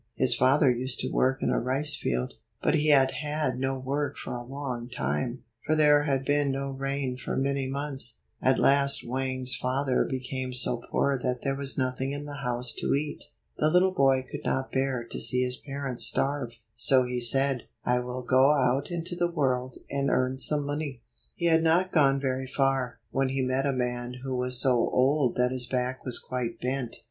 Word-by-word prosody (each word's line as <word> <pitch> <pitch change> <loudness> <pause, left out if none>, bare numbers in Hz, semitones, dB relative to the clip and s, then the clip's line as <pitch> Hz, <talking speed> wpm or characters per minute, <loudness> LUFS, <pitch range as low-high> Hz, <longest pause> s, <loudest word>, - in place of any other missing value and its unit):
His 130 -2 +2
father 130 +3 +4
used 125 +2 -1
to - - -3
work 135 +2 +1
in - - +1
a - - +1
rice 140 +4 0
field. 60 0 -2 0.3
But - - +1
he 155 -1 +1
had 135 -3 +5
had 145 -2 -2
no 135 0 -1
work 140 +3 -3
for - - -6
a 120 - -4
long 125 -2 -5
time, 120 - -3 0.2
for 155 - +1
there 150 -1 +4
had 135 -2 0
been 145 0 +2
no 135 0 -2
rain 135 -1 -3
for - - -4
many 135 0 0
months. 135 -4 -2 0.2
At 130 0 +3
last 140 -2 +3
Wang's 130 0 0
father 130 +1 0
became 130 -1 -4
so 125 0 +1
poor 140 -2 +1
that 125 0 -2
there 135 -1 0
was 140 0 -2
nothing 130 +1 -1
in 145 +1 -5
the 145 -1 -7
house 125 -2 0
to - - +1
eat. 145 +1 -4 0.3
The 155 - +3
little 180 +3 +4
boy 135 -4 +3
could - - -7
not 130 0 -2
bear 130 -2 -1
to 115 - -6
see 125 0 +2
his 125 0 -2
parents 140 -3 0
starve, 135 -4 0 0.2
so 130 +2 +4
he 125 0 -3
said, 135 +1 +4 0.2
"I 125 0 +2
will 125 +1 -5
go 130 +4 +4
out 130 0 +1
into 175 +1 -4
the 175 0 0
world, 130 -6 -1
and 140 0 -1
earn 130 +1 0
some 145 +1 0
money." 145 -4 -4 0.3
He 170 - -3
had 165 -1 +4
not 170 +3 +2
gone 140 -4 +3
very 130 -1 -2
far, 135 -2 0
when 135 0 0
he 135 0 -1
met 130 +2 0
a - - +2
man 125 -1 -3
who 130 -1 -3
was 125 0 +2
so 130 - +3
old 130 +2 +2
that 125 0 +1
his 125 -1 -1
back 125 0 -2
was 125 -2 +1
quite 125 -2 -4
bent. 125 -1 -3
130 Hz, 200 wpm, -27 LUFS, 125-140 Hz, 0.3 s, had